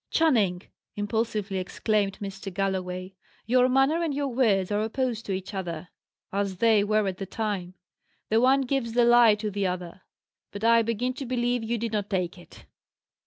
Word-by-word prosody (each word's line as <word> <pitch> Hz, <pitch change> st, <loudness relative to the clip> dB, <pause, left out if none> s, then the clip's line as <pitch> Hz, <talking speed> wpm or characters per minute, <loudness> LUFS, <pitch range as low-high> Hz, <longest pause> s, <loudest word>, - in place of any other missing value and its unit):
"Channing!" 215 Hz, -, +2 dB, 0.3 s
impulsively 205 Hz, -1 st, -2 dB
exclaimed 200 Hz, +1 st, -1 dB
Mr. 195 Hz, -1 st, -6 dB
Galloway, 185 Hz, -1 st, -3 dB, 0.3 s
"your 250 Hz, +2 st, +4 dB
manner 270 Hz, +6 st, +3 dB
and 320 Hz, -4 st, -1 dB
your 285 Hz, -1 st, -1 dB
words 215 Hz, -7 st, +2 dB
are 205 Hz, +1 st, +1 dB
opposed 230 Hz, 0 st, -2 dB
to -, -, -2 dB
each 190 Hz, +2 st, -4 dB
other, 175 Hz, -3 st, -5 dB, 0.4 s
as 200 Hz, -1 st, -1 dB
they 220 Hz, 0 st, +4 dB
were 215 Hz, 0 st, +1 dB
at 185 Hz, -1 st, -3 dB
the 195 Hz, -, -4 dB
time. 195 Hz, -4 st, -3 dB, 0.5 s
The 220 Hz, +1 st, +3 dB
one 265 Hz, +2 st, +4 dB
gives 255 Hz, -3 st, -1 dB
the 240 Hz, 0 st, +4 dB
lie 240 Hz, -2 st, +6 dB
to 210 Hz, 0 st, -4 dB
the 200 Hz, -1 st, -1 dB
other. 180 Hz, 0 st, -5 dB, 0.5 s
But 200 Hz, +1 st, -7 dB
I 230 Hz, 0 st, +5 dB
begin 230 Hz, +3 st, -1 dB
to 270 Hz, -, -6 dB
believe 245 Hz, -1 st, 0 dB
you 235 Hz, +1 st, -1 dB
did 230 Hz, 0 st, -3 dB
not 205 Hz, -2 st, -2 dB
take 185 Hz, -2 st, -2 dB
it." 175 Hz, -, -16 dB
215 Hz, 175 wpm, -26 LUFS, 195-240 Hz, 0.5 s, lie